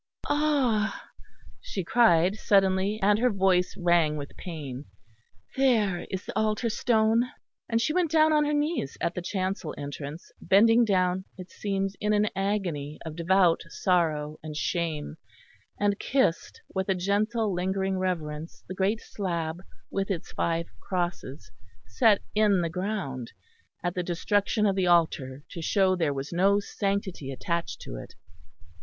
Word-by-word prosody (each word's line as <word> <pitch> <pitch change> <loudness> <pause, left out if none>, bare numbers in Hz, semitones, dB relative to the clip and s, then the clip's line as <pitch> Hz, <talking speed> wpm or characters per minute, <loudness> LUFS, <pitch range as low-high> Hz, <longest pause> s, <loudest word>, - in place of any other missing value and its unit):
"Ah!" 275 -8 +1 0.5
she 205 - -4
cried 180 -4 +4
suddenly, 195 0 +2
and 205 +1 +4
her 250 +1 +3
voice 190 -3 +2
rang 170 -4 +3
with 140 -1 -7
pain, 145 -6 -7 0.7
"there 220 -9 +2
is 190 0 -4
the - - -7
altar 215 +2 +1
stone." 225 +1 +2 0.4
And 230 -1 +2
she 235 +6 0
went 355 -2 +2
down 315 0 +4
on 300 -1 +4
her 295 - 0
knees 295 - -1
at 170 - -1
the 180 - -4
chancel 185 -2 -3
entrance, 145 +2 -7
bending 225 +4 +5
down, 185 -2 +1
it 185 0 -10
seemed, 195 -1 -2
in 210 0 +1
an 210 0 +2
agony 180 -7 -2
of 160 -1 -6
devout 175 0 +3
sorrow 155 -5 0
and 155 -1 -6
shame; 160 -3 -2 0.6
and 205 0 +1
kissed 260 -10 0
with 190 0 -2
a 190 - +3
gentle, 205 +3 0
lingering 190 +1 -1
reverence 160 -4 -3
the 185 - -5
great 195 +4 0
slab 170 -4 -3 0.3
with 195 0 -2
its 180 -5 -3
five 170 0 -1
crosses, 175 - -4 0.3
set 200 - +3
in 210 -3 +3
the 170 - -1
ground 180 - -4 0.5
at 175 -1 -1
the 180 - -1
destruction 205 +5 0
of 195 -2 +2
the 190 -2 +1
altar 145 -6 +2
to 170 - -6
show 190 +2 +2
there 165 -5 +1
was 140 +3 -5
no 195 +3 +4
sanctity 195 -8 -3
attached 170 +5 -3
to - - -7
it. - - -10
190 Hz, 150 wpm, -27 LUFS, 165-210 Hz, 0.7 s, bending